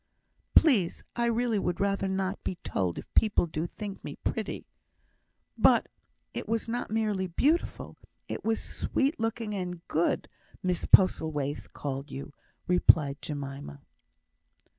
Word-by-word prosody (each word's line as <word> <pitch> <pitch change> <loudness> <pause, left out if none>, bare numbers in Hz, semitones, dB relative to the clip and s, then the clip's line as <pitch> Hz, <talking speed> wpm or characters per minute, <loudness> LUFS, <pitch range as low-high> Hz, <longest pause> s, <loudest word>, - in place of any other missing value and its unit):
"Please, 225 - +4
I 235 - +1
really 235 -2 +1
would 175 -3 -1
rather 195 -1 +1
not 190 +1 -2
be - - -2
told 90 -3 -1
if - - -9
people 215 -5 +4
do 160 0 -3
think 200 +1 -7
me - - -6
pretty." - - -3 0.9
"But - - +5 0.4
it - - -5
was 230 0 0
not 240 +2 -2
merely 210 -3 0
beautiful; 295 - 0 0.3
it - - -5
was 225 0 +1
sweet 275 +1 -1
looking 225 -1 -2
and 180 -3 -5
good, 165 +3 +1 0.4
Mrs 180 -1 -1
Postlethwaite 150 -6 +3
called 135 0 -4
you," 140 +1 -7 0.3
replied 155 -5 +4
Jemima. 140 -1 -6
190 Hz, 130 wpm, -29 LUFS, 155-225 Hz, 0.9 s, But